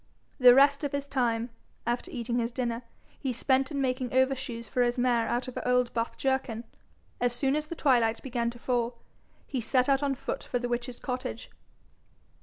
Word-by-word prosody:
The 250 Hz, -1 st, +9 dB
rest 280 Hz, +2 st, +5 dB
of 285 Hz, -, -2 dB
his 280 Hz, 0 st, -2 dB
time, 240 Hz, -3 st, 0 dB, 0.3 s
after 240 Hz, +1 st, -1 dB
eating 240 Hz, 0 st, -2 dB
his 235 Hz, 0 st, -1 dB
dinner, 235 Hz, -1 st, -2 dB, 0.4 s
he 270 Hz, -, -1 dB
spent 265 Hz, +2 st, +1 dB
in 285 Hz, -, -3 dB
making 255 Hz, -2 st, -1 dB
overshoes 260 Hz, -3 st, 0 dB
for 250 Hz, -, 0 dB
his 240 Hz, +1 st, +2 dB
mare 245 Hz, -2 st, +2 dB
out 245 Hz, +2 st, -1 dB
of 255 Hz, -, -7 dB
an -, -, -3 dB
old 250 Hz, -1 st, +2 dB
buff 230 Hz, 0 st, -2 dB
jerkin. 265 Hz, -4 st, -1 dB, 0.6 s
As 245 Hz, -1 st, +1 dB
soon 270 Hz, +3 st, +1 dB
as 305 Hz, 0 st, -2 dB
the 335 Hz, -, -5 dB
twilight 240 Hz, -7 st, +3 dB
began 240 Hz, -3 st, -1 dB
to 240 Hz, -, -9 dB
fall, 240 Hz, -1 st, -1 dB, 0.5 s
he 260 Hz, -3 st, -3 dB
set 250 Hz, +3 st, +2 dB
out 275 Hz, 0 st, +3 dB
on 280 Hz, -1 st, 0 dB
foot -, -, -4 dB
for -, -, -2 dB
the 245 Hz, 0 st, -2 dB
witch's 240 Hz, 0 st, -3 dB
cottage. 250 Hz, -, -5 dB
250 Hz, 195 wpm, -29 LUFS, 235-270 Hz, 0.6 s, The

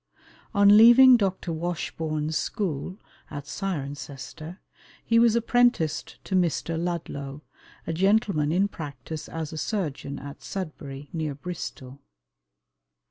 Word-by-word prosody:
On 200 Hz, +1 st, +7 dB
leaving 245 Hz, +3 st, +9 dB
Dr. 190 Hz, -5 st, -1 dB
Washbourn's 160 Hz, -2 st, -3 dB
school, 185 Hz, -1 st, -2 dB, 0.3 s
at 145 Hz, -2 st, -6 dB
Cirencester, 150 Hz, -1 st, -6 dB, 0.5 s
he 230 Hz, 0 st, +4 dB
was 235 Hz, -1 st, +5 dB
apprenticed 235 Hz, -9 st, +1 dB
to -, -, -6 dB
Mr. 170 Hz, -2 st, +1 dB
Ludlow, 150 Hz, -5 st, -4 dB, 0.4 s
a 165 Hz, -, -2 dB
gentleman 195 Hz, -4 st, +2 dB
in 190 Hz, +4 st, +3 dB
practice 150 Hz, -3 st, -7 dB
as 160 Hz, -1 st, -5 dB
a 155 Hz, -, -4 dB
surgeon 150 Hz, -7 st, -3 dB
at 140 Hz, +1 st, -9 dB
Sudbury, 145 Hz, -6 st, -6 dB
near 155 Hz, -4 st, -2 dB
Bristol. 140 Hz, -5 st, -7 dB
165 Hz, 110 wpm, -26 LUFS, 145-195 Hz, 0.5 s, leaving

